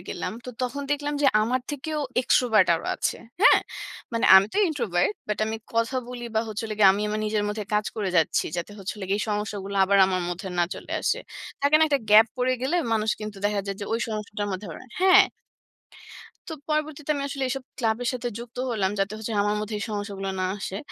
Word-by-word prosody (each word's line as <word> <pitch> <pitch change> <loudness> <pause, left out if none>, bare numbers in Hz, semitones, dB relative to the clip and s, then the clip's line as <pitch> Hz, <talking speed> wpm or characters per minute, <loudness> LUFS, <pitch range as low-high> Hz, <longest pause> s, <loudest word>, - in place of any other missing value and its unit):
গেলাম, - - -4
তো 250 - -6
তখন 255 +3 -2
দেখলাম 290 0 -2
যে - - +5 0.2
আমার 250 +4 0
থেকেও 300 +2 -4 0.2
এক্সট্রোভার্ট 225 -7 +4
আরো 165 - -4
আছে। - - -1 0.3
হ্যাঁ? - - +7 0.5
মানে 230 - 0
আমি 190 +1 +6
তো - - +1
ইন্ট্রোভার্ট। 220 - 0 0.2
বাট 210 - -1
আমি 220 - -2 0.2
কথা 230 +3 +1
বলি 245 -1 -6
বা 220 - +3
হলে 215 0 -4 0.2
আমি 200 +2 -2
আমার 215 +1 -2
নিজের 210 -1 0
মধ্যে 210 0 -3
কাজ 210 0 +1
করে 205 -3 -1
যাচ্ছি। 160 -2 +2
যাতে 175 +4 -4
হচ্ছে 195 -1 -4
হলো 205 - -6
গিয়ে, 200 +1 +1
এই - - -1
সমস্যাগুলো 205 -1 -3
আবার 200 +1 +3
আমার 185 -1 -1
মধ্যে 180 +2 -5
না 175 - +4
চলে - - -9
আসে। - - +1 0.4
থাকে 285 +2 +3
না - - +4
একটা 280 -2 +1
গ্যাপ? 215 +2 +8
পড়ে 255 0 +1
গেলে 280 +7 +1 0.2
মানুষ 220 -1 +1
কিন্তু 215 -1 -6
দেখা 205 0 +1
যায় 195 -1 -3
যে, - - -3 0.2
সমস্যাটার 210 -1 -4
মধ্যে 190 +2 -5
আবার 160 - -9 0.2
হ্যাঁ। 375 0 +8 1.3
তো 320 - -4
পরবর্তীতে 305 -1 -2
আমি 285 - -3
আসলে 275 -1 -3
এইসব 270 0 -3
ক্লাবের 230 0 0
সাথে 245 -1 -3
যুক্ত 235 0 -10
হলাম। 200 -5 0
যাতে 195 +1 0
হচ্ছে 220 +1 -5
আমার 205 +1 0
মধ্যে 215 +1 -4
এই 205 - -3
সমস্যাগুলো 200 -2 -4
না - - +1
আসে। 195 -1 -5
215 Hz, 205 wpm, -25 LUFS, 205-255 Hz, 1.3 s, গ্যাপ